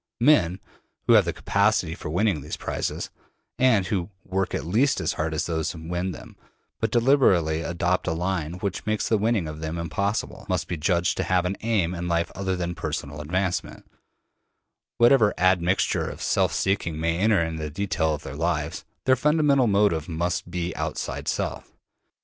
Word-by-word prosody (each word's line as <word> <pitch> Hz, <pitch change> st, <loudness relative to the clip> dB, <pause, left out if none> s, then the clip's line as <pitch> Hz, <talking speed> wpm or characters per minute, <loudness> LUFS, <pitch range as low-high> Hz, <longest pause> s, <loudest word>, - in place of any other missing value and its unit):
Men 115 Hz, -, +4 dB, 0.5 s
who -, -, +5 dB
have -, -, +6 dB
the -, -, 0 dB
capacity 80 Hz, -, +1 dB
for 85 Hz, -, -7 dB
winning 90 Hz, -1 st, +1 dB
these 75 Hz, -, -6 dB
prizes, -, -, -3 dB, 0.5 s
and 120 Hz, -7 st, +4 dB
who 90 Hz, 0 st, -2 dB, 0.2 s
work 95 Hz, 0 st, -1 dB
at -, -, -3 dB
least 115 Hz, -, +2 dB
as -, -, -1 dB
hard 80 Hz, +1 st, -2 dB
as 80 Hz, +1 st, -1 dB
those 80 Hz, -2 st, -1 dB
who 80 Hz, -1 st, -9 dB
win 90 Hz, +2 st, -2 dB
them, 80 Hz, -, -11 dB, 0.4 s
but 110 Hz, -, 0 dB
deliberately 105 Hz, -, +3 dB
adopt 85 Hz, +2 st, -1 dB
a 80 Hz, -, +1 dB
line 85 Hz, -1 st, -2 dB
which 95 Hz, +3 st, -4 dB
makes 110 Hz, -1 st, 0 dB
the 110 Hz, -, +2 dB
winning 110 Hz, -5 st, +1 dB
of 75 Hz, 0 st, -7 dB
them 80 Hz, +1 st, -4 dB
impossible, 100 Hz, +5 st, -2 dB
must -, -, 0 dB
be 90 Hz, -, -2 dB
judged 85 Hz, +2 st, +1 dB
to -, -, 0 dB
have 90 Hz, -1 st, +1 dB
an 95 Hz, +2 st, -1 dB
aim 105 Hz, -7 st, +1 dB
in 85 Hz, 0 st, -4 dB
life 85 Hz, 0 st, 0 dB
other 95 Hz, -1 st, -2 dB
than 85 Hz, -1 st, -3 dB
personal 75 Hz, -3 st, -4 dB
advancement; 90 Hz, +4 st, -2 dB, 1.1 s
whatever 120 Hz, -3 st, +5 dB
admixture 90 Hz, 0 st, +2 dB
of -, -, -8 dB
self -, -, +1 dB
seeking 85 Hz, -5 st, -1 dB
may 85 Hz, +1 st, 0 dB
enter 105 Hz, +1 st, +4 dB
into 80 Hz, -1 st, -4 dB
the 75 Hz, -, -3 dB
detail 80 Hz, -2 st, 0 dB
of 75 Hz, -, -10 dB
their 70 Hz, -, -7 dB
lives, 80 Hz, -1 st, -2 dB, 0.2 s
their 130 Hz, -, +5 dB
fundamental 145 Hz, -2 st, +3 dB
motive 100 Hz, -6 st, +2 dB
must 85 Hz, +1 st, -2 dB
be 85 Hz, 0 st, -3 dB
outside -, -, -4 dB
Self. -, -, -3 dB
90 Hz, 180 wpm, -25 LUFS, 80-100 Hz, 1.1 s, have